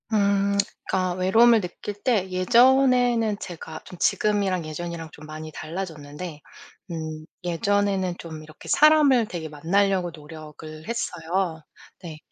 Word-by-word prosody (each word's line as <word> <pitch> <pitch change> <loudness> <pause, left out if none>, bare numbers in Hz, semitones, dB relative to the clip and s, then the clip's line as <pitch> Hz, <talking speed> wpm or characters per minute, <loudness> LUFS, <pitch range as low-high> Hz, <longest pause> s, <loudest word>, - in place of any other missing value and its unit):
음. 200 -1 +2 0.3
그니까 185 -1 +1
외로움을 220 +6 +5
느낄 180 +3 -6
때 210 -7 +1
예전에는 240 +2 +4
제가 160 -4 -8
좀 180 - -11
지금이랑 195 -3 +1
예전이랑 165 +1 -6
좀 150 - -12
많이 155 +1 -8
달라졌는데 155 -2 -6 0.5
음 155 -1 -5 0.2
예전에는 190 +1 +1
좀 160 -2 -8
이렇게 155 0 -14
사람을 290 -6 +5
되게 165 -3 -5
만나려고 180 +4 +1
노력을 155 0 -11
했어요. 175 -6 -2 0.4
네. 160 -3 -7
180 Hz, 285 characters per minute, -24 LUFS, 160-205 Hz, 0.5 s, 외로움을